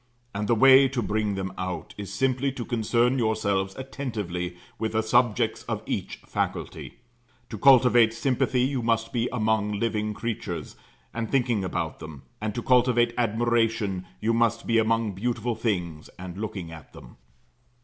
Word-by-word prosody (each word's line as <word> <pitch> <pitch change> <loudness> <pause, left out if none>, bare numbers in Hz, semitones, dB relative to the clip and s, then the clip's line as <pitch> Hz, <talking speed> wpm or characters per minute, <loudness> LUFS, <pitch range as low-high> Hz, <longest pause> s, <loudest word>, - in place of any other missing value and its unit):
And 105 +1 -2
the 120 - +3
way 135 +3 +7
to 130 -3 -2
bring 105 0 -1
them 95 -1 -4
out, 90 -1 -4
is 100 -2 -7
simply 130 +5 0
to 120 -3 -5
concern 120 +2 +1
yourselves 100 -4 0
attentively 105 -10 -4 0.2
with 110 0 -2
the 110 0 +1
subjects 120 0 +2
of - - -2
each - - -3
faculty. - - -4 0.5
To 110 - -6
cultivate 125 -3 +6
sympathy 125 +1 0
you 130 -1 0
must 115 0 0
be 120 -1 0
among 110 -3 0
living 105 0 -1
creatures, 100 -9 -4 0.4
and 115 -1 -3
thinking 120 -6 +1
about 85 -3 -3
them; 80 -3 -10 0.2
and 110 -1 -3
to 120 - -3
cultivate 120 -2 +3
admiration, 115 -4 0
you 115 +2 +1
must 115 0 +1
be 115 -1 +3
among 115 -1 +1
beautiful 120 +4 -2
things 90 -9 -3
and 90 -1 -8
looking 95 -5 -5
at 80 -2 -12
them. - - -14
115 Hz, 155 wpm, -26 LUFS, 100-120 Hz, 0.5 s, way